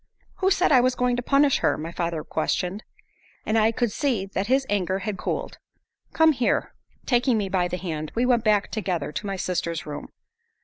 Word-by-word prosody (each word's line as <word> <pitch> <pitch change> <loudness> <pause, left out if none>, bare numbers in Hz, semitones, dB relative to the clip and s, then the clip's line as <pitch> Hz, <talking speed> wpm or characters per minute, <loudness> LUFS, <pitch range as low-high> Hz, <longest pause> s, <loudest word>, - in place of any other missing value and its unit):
"Who 380 - +2
said 370 -3 +2
I 260 -3 +7
was 255 0 +2
going 250 0 +1
to - - -1
punish 275 +2 +3
her?" - - +1
my 160 +2 -5
father 170 -2 -3
questioned. 180 +5 -2 0.6
And 215 - 0
I 220 0 +4
could 235 -1 -1
see 245 -7 0
that 195 +1 -3
his 265 +2 +2
anger 190 -2 0
had 205 +1 -3
cooled. - - -4 0.5
"Come 320 0 +5
here!" 255 -5 0 0.3
Taking 245 -1 +2
me 200 -2 -1
by 185 -2 +1
the 180 - -4
hand, 155 -4 -4
we 240 +2 +2
went 245 -2 +3
back 210 -2 +2
together 180 -9 -2
to 210 +5 -5
my 195 - -2
sister's 170 -3 -2
room. 150 -1 -6
210 Hz, 195 wpm, -25 LUFS, 180-250 Hz, 0.6 s, I